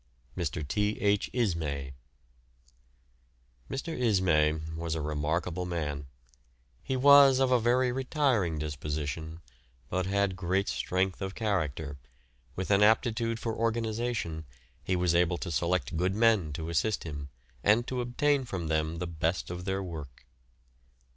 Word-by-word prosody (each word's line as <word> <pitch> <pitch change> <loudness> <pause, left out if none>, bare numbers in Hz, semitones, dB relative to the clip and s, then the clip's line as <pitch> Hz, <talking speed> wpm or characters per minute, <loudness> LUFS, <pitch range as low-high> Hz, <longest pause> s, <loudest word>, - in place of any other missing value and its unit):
MR. 80 -4 -3
T. 105 +7 0
H. 105 -3 +2
ISMAY. 80 - -1 1.8
Mr. 160 +4 -4
Ismay 95 -10 +3 0.2
was 80 0 -3
a - - -2
remarkable 80 +4 -2
man. 75 -5 -3 0.7
He 130 - -2
was 140 0 +8
of 130 -1 +2
a 125 - +5
very 125 +2 +2
retiring 125 - +1
disposition, 75 +2 -4 0.5
but 95 0 -1
had 100 -1 +1
great 95 +2 0
strength 95 +1 -1
of 95 0 -4
character, 80 - -2 0.6
with 95 +2 -3
an 100 0 +5
aptitude 115 +1 +3
for 115 0 -2
organisation, 115 -7 -1 0.4
he 95 - 0
was 90 -1 +2
able 85 0 +3
to 85 - -5
select 85 +4 0
good 90 +4 0
men 110 -8 +3
to 80 +2 -5
assist 90 +6 0
him, 75 -3 -6 0.3
and 110 +4 +4
to 125 0 -2
obtain 140 +3 +1
from 95 -9 -4
them 80 +1 0
the 90 - -3
best 85 +1 -2
of 90 0 -6
their 95 0 -1
work. 75 -9 -8
90 Hz, 135 wpm, -29 LUFS, 80-115 Hz, 1.8 s, was